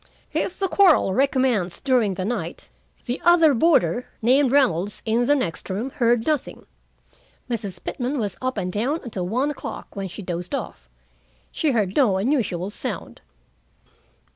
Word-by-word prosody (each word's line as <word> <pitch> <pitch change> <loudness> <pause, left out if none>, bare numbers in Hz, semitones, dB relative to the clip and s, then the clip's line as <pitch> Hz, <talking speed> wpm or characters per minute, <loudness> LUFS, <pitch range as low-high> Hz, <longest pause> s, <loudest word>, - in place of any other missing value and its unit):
If 360 - -2
the 390 - 0
quarrel 360 - +4
recommenced 255 -7 +1
during 245 -8 +2
the 185 0 -3
night, 195 -7 -4 0.4
the 245 +1 -3
other 335 -4 +6
boarder, 245 - +2
named 255 +3 +3
Reynolds, 205 - +1
in 235 +2 +1
the 290 - +5
next 185 - -3
room, 215 +8 -3
heard 235 -2 +1
nothing. 305 -4 -2 0.8
Mrs. 205 -7 -4
Pitman 260 +3 -3
was 205 -6 -2
up 255 -2 -2
and 180 -2 -2
down 265 +10 -1
until 195 -8 -4
one 255 +9 0
o'clock, 290 - -8
when 195 -1 -3
she 190 +3 -8
dozed 175 0 -3
off. - - -7 0.6
She 315 - 0
heard 210 -7 0
no 225 -10 +3
unusual 200 - 0
sound. - - -6
235 Hz, 150 wpm, -23 LUFS, 190-270 Hz, 0.8 s, other